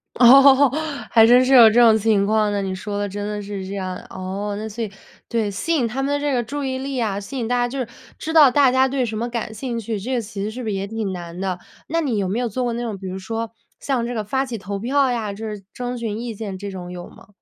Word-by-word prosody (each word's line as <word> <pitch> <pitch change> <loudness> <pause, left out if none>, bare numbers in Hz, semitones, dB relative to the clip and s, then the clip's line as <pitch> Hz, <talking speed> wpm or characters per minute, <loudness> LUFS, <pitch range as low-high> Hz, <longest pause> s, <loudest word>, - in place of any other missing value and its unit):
哦， 270 +3 +7 0.4
还 225 -1 +7
真 250 +2 +6
是 270 - +2
有 235 -3 +9
这 230 +3 +3
种 230 -2 +7
情 210 -2 +2
况 215 0 +2
呢？ 205 -1 -1
你 190 -1 -3
说 205 +2 -5
的 205 - -1
真 205 +1 -5
的 210 0 -3
是 200 -1 -6
这 195 - -6
样。 185 -2 -3
哦， 195 +2 -4
那 215 +1 -4
所 225 +2 -5
以 210 - -5 0.4
对， 225 -3 0
吸 330 +12 -1
引 250 -6 +1
他 255 +5 -3
们 275 +1 -1
的 285 - +1
这 290 -1 -1
个 245 - +2
注 285 +6 -5
意 260 -1 -2
力 270 -1 -3
啊， 205 -4 -1
吸 205 +7 -7
引 230 -2 -2
大 245 - +1
家， 245 0 +1
就 270 - -6
是 245 - -2 0.3
知 320 - -4
道 300 -5 +8
大 270 0 +4
家 260 +1 +4
对 260 -1 0
什 220 - -4
么 235 +2 -2
感 230 -2 -4
兴 235 +1 -4
趣， 220 -1 -3
这 255 +6 -3
个 240 - 0
其 205 -2 -7
实 210 - -2
是 245 +3 -7
不 220 - -3
是 205 - -1
也 195 +1 -3
挺 220 -2 -3
难 175 -1 -7
的？ 185 -2 -2 0.3
那 330 +1 0
你 255 -9 -1
有 195 - 0
没 200 +6 -1
有 245 -2 -1
做 255 +5 -2
过 240 -1 -1
那 240 - -3
种， 220 -4 -4
比 190 - -8
如 185 +1 -5
说 225 +3 -4 0.3
像 255 -4 -1
这 245 - -4
个 215 - -2
发 265 +6 0
起 240 -3 -5
投 200 0 -5
票 265 +3 +2
呀， 220 -4 -2
就 220 +2 -6
是 210 -2 -7
征 245 0 -4
询 220 -2 -3
意 235 -1 -4
见 205 -3 -6
这 200 +1 -6
种 180 -2 -7
有 175 -1 -8
吗？ - - -17
225 Hz, 315 characters per minute, -21 LUFS, 200-250 Hz, 0.4 s, 有